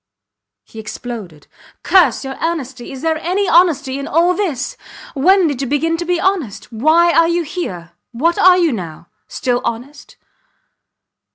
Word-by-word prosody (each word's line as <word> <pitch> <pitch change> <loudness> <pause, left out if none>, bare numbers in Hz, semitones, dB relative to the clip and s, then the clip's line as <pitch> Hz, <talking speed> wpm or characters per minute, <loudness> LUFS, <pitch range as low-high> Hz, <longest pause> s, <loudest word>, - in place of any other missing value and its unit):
He 225 - -12
exploded. 220 -7 -8 0.4
Curse 365 -6 +3
your 270 0 -5
honesty!... 275 -7 -4
Is 270 +1 -9
there 320 -1 0
any 375 +5 -1
honesty 290 -7 +2
in 280 - -5
all 340 +4 +2
this!... 320 -10 -3 0.4
When 365 +6 +4
did 285 -5 -1
you 270 - -2
begin 315 +5 0
to 345 - -4
be 355 0 0
honest? 335 - -2
Why 315 +9 +3
are 330 0 +4
you 340 0 0
here? 190 - -6 0.2
What 320 +9 0
are 365 0 +6
you 340 -4 +2
now?... 175 -6 -7 0.2
Still 245 -1 -2
honest? 255 +6 -6
295 Hz, 155 wpm, -17 LUFS, 245-345 Hz, 0.4 s, are